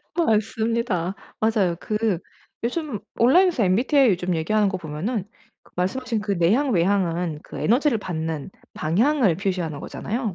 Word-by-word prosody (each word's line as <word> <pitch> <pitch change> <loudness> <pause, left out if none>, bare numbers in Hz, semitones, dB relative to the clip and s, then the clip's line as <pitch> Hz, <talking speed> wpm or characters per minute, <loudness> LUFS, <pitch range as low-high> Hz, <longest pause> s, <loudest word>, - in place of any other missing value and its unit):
맞습니다. 220 - 0 0.3
맞아요. 210 -6 +2
그 215 -4 0 0.4
요즘 255 -2 -2 0.2
온라인에서 300 - +4
MBTI 245 +7 +4
요즘 180 -1 0
얘기하는 205 +6 +2
거 190 - -2
보면은 180 +7 -3 0.4
그 - - -24
말씀하신 225 +5 -1
그 205 -1 -2
내향, 210 +11 +2
외향은 175 -3 +1
그 - - -9
에너지를 245 +1 +2
받는 160 -4 -4 0.2
방향을 210 - +2
표시하는 180 -6 -2
거잖아요. 220 +2 -4
205 Hz, 335 characters per minute, -23 LUFS, 175-235 Hz, 0.4 s, 온라인에서